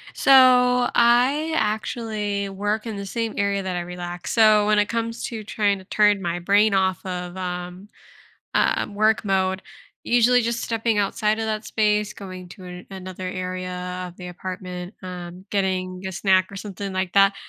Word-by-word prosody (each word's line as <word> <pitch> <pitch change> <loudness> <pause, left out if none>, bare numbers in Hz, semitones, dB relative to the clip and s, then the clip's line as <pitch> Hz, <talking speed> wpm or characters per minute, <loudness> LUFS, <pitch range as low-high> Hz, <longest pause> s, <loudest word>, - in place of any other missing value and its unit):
So, 250 -2 +6
I 250 +7 +4
actually 215 -3 -2
work 205 +3 -2
in 220 -2 -4
the 200 - -5
same 225 +2 -3
area 200 0 0
that 185 -1 -3
I 175 - -1
relax. 175 0 -6
So, 215 -2 +5
when 210 0 +3
it 205 - +2
comes 230 0 -3
to 225 -2 -5
trying 205 -1 0
to - - -13
turn 205 0 +3
my 175 -1 -2
brain 205 +4 +3
off 190 -2 +1
of, 180 -1 -5
um, 180 +1 -5 0.7
um, 205 - +1
work 215 +1 +2
mode, 190 -1 0 0.4
usually 245 +1 +4
just 235 +1 -2
stepping 225 -1 0
outside 210 +2 +1
of 225 - -1
that 215 0 -2
space, 210 -1 +1
going 185 -4 -9
to 185 - -12
an 180 0 -9
another 185 -1 -7
area 185 0 -4
of 175 - -14
the 180 -1 -8
apartment, 180 +1 -7
um, 180 0 -8
getting 185 -2 -1
a 190 - -4
snack 185 0 +2
or - - -8
something 200 -1 -6
like 185 -1 -2
that. 195 0 +5
200 Hz, 170 wpm, -23 LUFS, 185-220 Hz, 0.7 s, So